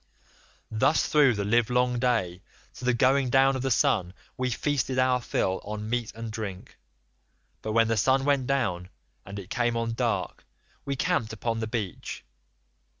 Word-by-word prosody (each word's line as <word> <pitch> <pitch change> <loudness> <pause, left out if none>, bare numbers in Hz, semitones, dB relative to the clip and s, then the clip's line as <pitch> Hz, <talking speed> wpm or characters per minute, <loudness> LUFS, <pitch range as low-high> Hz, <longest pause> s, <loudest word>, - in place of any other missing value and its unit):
"Thus 110 +8 +2
through 145 -6 +4
the 100 -1 -2
livelong 125 +3 +2
day 110 -8 0 0.3
to - - -9
the 125 - +3
going 130 +1 +3
down 135 +1 +4
of 130 - -2
the 135 - -1
sun 90 -6 +1 0.2
we 130 0 -1
feasted 130 0 -1
our 130 -1 +3
fill 95 -5 -1
on 105 +1 -5
meat 120 -2 -1
and 115 0 -6
drink, 105 -4 -7 0.8
but 110 - -3
when 115 0 +4
the 115 - +1
sun 135 +5 +3
went 140 -3 +2
down 100 -10 -1 0.4
and 100 0 -7
it 100 -1 -9
came 120 -2 0
on 115 0 -1
dark, 115 - -2 0.4
we 140 - -2
camped 110 -3 0
upon 115 +1 -2
the 110 - -2
beach. 110 -5 -5
120 Hz, 165 wpm, -27 LUFS, 110-130 Hz, 0.8 s, through